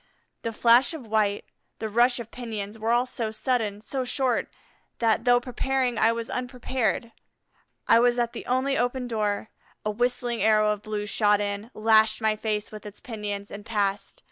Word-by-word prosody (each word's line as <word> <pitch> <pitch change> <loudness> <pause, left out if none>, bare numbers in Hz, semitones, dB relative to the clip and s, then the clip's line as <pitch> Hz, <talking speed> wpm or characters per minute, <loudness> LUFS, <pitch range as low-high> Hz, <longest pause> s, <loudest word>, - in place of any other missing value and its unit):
The 230 - -3
flash 235 +7 +4
of 280 -7 -8
white, 210 -2 0 0.3
the 220 - -3
rush 240 +3 +3
of 235 -1 -8
pinions, 220 -3 -6
were 220 +1 -2
all 240 +1 +3
so 240 -3 -2
sudden, 220 -3 -1
so 260 +4 -3
short, 255 -1 0 0.5
that, 230 0 +1
though 245 0 +5
preparing, 250 -1 -1
I 225 - +5
was 230 0 -3
unprepared. 250 -2 -2 0.8
I 230 - +6
was 245 0 +3
at 240 -1 0
the - - -8
only 260 +2 +1
open 245 0 -1
door. 215 -2 -1 0.4
A 215 - +1
whistling 240 +1 -1
arrow 215 -1 +4
of 210 -1 -3
blue 210 -1 -4
shot 210 -1 +2
in, 205 +2 -3
lashed 220 0 +4
my 220 -1 +1
face 215 -1 -3
with 215 -1 -9
its 210 -1 -10
pinions, 205 -3 -5
and 205 +1 -8
passed. 205 -2 -2
225 Hz, 175 wpm, -26 LUFS, 210-245 Hz, 0.8 s, I